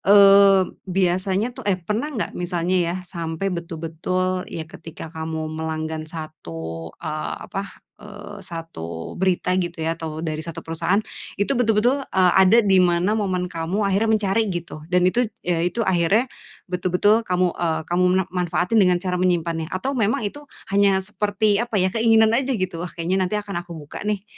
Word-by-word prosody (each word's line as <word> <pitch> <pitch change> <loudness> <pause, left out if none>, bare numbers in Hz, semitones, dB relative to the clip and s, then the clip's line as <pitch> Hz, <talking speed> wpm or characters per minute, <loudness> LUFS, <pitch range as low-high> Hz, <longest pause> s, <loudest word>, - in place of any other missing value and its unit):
Eee, 200 -1 +7 0.2
biasanya 190 +4 +1
tuh 260 0 -10
eh, 190 - +3
pernah 210 - -2
enggak 260 -8 -3
misalnya 175 0 -1
ya 170 0 0
sampai 170 +1 -4
betul-betul, 170 +2 -2
ya 160 - -5
ketika 160 0 -10
kamu 160 0 -4
melanggan 160 0 -3
satu, 80 - -7
eee, 155 0 -4
apa, 195 0 -5 0.3
eee, 205 0 -10
satu 165 - -7
berita 185 -1 +1
gitu 175 -1 -4
ya, 165 - +1
atau 160 -1 -5
dari 155 -1 -2
satu 165 0 -7
perusahaan, 165 +5 0 0.4
itu 200 +7 +1
betul-betul, 245 +2 +2 0.2
eee, 185 -2 +5
ada 215 +5 +6
di 190 -2 +5
mana 175 +3 +3
momen 190 -4 0
kamu 180 +4 -2
akhirnya 200 +3 +2
mencari 215 0 +2
gitu, 170 -4 -5
dan 180 0 +3
itu 185 +7 +3 0.2
ya, 175 -1 +1
itu 180 +7 0
akhirnya 190 +5 +3 0.4
betul-betul 185 +4 +2
kamu, 180 -1 +2
eee, 160 -2 0
kamu 175 +1 +1
mena 185 +1 +2
manfaatin 180 +4 +1
dengan 180 -2 +4
cara 180 0 -2
menyimpannya, 170 -3 0
atau 185 +10 -2
memang 225 -3 0
itu 250 +8 -4 0.3
hanya 200 -1 +4
seperti 210 +1 +1
apa 235 -2 -2
ya, 185 -1 +2
keinginan 225 -1 +4
aja 260 +1 +1
gitu? 185 -3 -3
Wah, 180 - -3
kayaknya 175 +3 -1
nanti 185 +3 0
akan 205 -4 -3
aku 175 0 -10
buka 145 -2 -9
nih, 205 -2 -1
180 Hz, 165 wpm, -22 LUFS, 165-205 Hz, 0.4 s, Eee